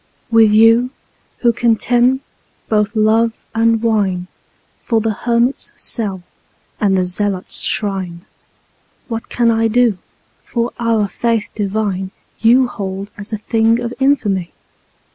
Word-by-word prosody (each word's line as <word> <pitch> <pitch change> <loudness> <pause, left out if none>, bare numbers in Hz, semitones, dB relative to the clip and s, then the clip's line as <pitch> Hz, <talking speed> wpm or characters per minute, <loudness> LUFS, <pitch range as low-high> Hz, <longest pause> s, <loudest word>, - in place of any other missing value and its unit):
With 225 -1 +6
you, 225 +3 +5 0.5
who 235 -1 +3
contemn 240 +3 +2 0.5
both 210 0 +1
love 220 +1 +3 0.2
and 225 0 +2
wine2 200 -6 0 0.6
for 230 -2 +1
the 220 0 0
hermit's 235 +4 0
cell 195 -6 -1 0.6
and 195 -2 +2
the 185 - +1
zealot's 190 +1 -1
shrine, 190 -4 -2 0.8
What 225 +1 -5
can 235 -1 +2
I 225 0 +2
do, 230 -3 +2 0.4
for 235 0 -2
our 225 -3 +1
Faith 230 0 -1
divine 200 -2 -2 0.3
you 245 +4 +5
hold 195 -3 -6
as 205 +2 -8
a 215 - -2
thing 225 +2 +1
of 240 0 -4
infamy? 215 -10 +1
225 Hz, 125 wpm, -17 LUFS, 200-235 Hz, 0.8 s, With